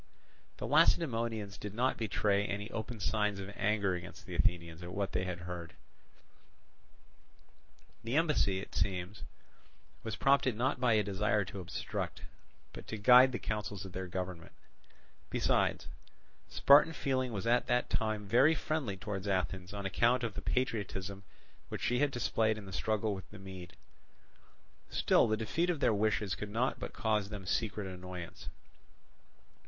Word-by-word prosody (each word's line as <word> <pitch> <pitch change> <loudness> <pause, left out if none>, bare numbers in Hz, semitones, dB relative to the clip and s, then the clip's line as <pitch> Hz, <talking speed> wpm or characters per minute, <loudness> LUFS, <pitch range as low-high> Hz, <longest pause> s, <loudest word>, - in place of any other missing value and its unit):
The - - -4
Lacedaemonians 115 -8 +2
did 105 0 -6
not 125 +3 +2
betray 100 -2 +1
any 105 +2 -4
open 115 +1 -5
signs 105 +1 0
of 100 +1 -6
anger 100 -1 +1
against 90 0 -7
the - - -8
Athenians 85 -1 0
at 85 0 -7
what 100 0 -2
they 90 0 -1
heard. 90 -1 -6 2.3
The 115 +4 -2
embassy, 150 - +2
it 100 - -9
seems, 95 +1 -2 0.8
was 110 -1 -4
prompted 135 -3 +3
not 130 +3 0
by 125 -2 +3
a 105 -1 +3
desire 105 +1 +1
to 100 - -7
obstruct, 90 - -4 0.5
but - - -10
to 110 - -4
guide 125 +5 +7
the 120 - -2
counsels 105 -3 -4
of 95 - -8
their 95 +1 -5
government: 90 -2 -5 0.8
besides, - - +1 0.6
Spartan 145 +3 +6
feeling 130 -4 -1
was 105 -1 -4
at 120 +1 +3
that 125 +1 +2
time 110 -2 -1
very 135 +10 +5
friendly 150 -12 -2
towards 100 0 -4
Athens 95 -1 -1
on 100 -1 -5
account 120 +6 +2
of 115 -3 -2
the - - -5
patriotism 100 -5 -2 0.5
which - - -5
she 125 0 +1
had 145 +1 +3
displayed 110 -3 +1
in 105 - -8
the 95 - -9
struggle 110 +2 0
with 95 -3 -8
the 105 - -11
Mede. 95 -2 -10 1.1
Still - - +3
the 110 - +1
defeat 160 +11 0
of 170 -4 0
their 110 - +3
wishes 105 -1 +1
could 105 +1 -5
not 115 +5 0
but - - -5
cause 105 -3 0
them 105 -3 -7
secret 105 +1 -1
annoyance. 90 -2 -7
105 Hz, 155 wpm, -33 LUFS, 95-115 Hz, 2.3 s, guide